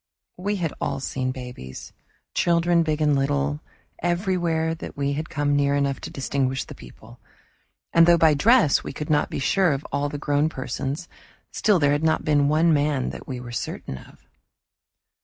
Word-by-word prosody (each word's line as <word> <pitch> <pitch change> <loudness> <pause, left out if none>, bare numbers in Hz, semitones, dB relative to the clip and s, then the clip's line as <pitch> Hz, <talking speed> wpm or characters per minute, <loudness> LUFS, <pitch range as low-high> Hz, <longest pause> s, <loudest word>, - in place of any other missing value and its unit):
We 200 +3 -1
had 170 -6 -2
all - - -1
seen 130 -1 -2
babies, 125 - -9 0.4
children 170 0 +3
big 155 -1 -1
and 150 -1 +3
little, 145 +2 0 0.4
everywhere 175 -3 0
that 165 - -8
we 140 0 0
had 155 +3 -4
come 145 -1 0
near 140 0 +2
enough 140 -1 0
to - - -6
distinguish 135 -1 -1
the - - -10
people. - - -14 0.7
And 165 0 +6
though 170 0 +6
by 160 -2 +5
dress 210 - +4
we - - -6
could 150 +2 -4
not 150 - +2
be - - -4
sure 175 +4 +2
of 140 +1 -5
all 145 +1 0
the 145 - -5
grown 145 +1 +1
persons, 135 +4 -4 0.4
still 210 -3 +2
there 145 -3 +3
had 145 +2 0
not 160 0 +1
been 145 -2 +3
one 160 +2 +4
man 145 -3 +1
that - - -10
we 130 -2 -5
were 120 -1 -8
certain 65 - -5
of. - - -18
145 Hz, 180 wpm, -24 LUFS, 140-165 Hz, 0.7 s, And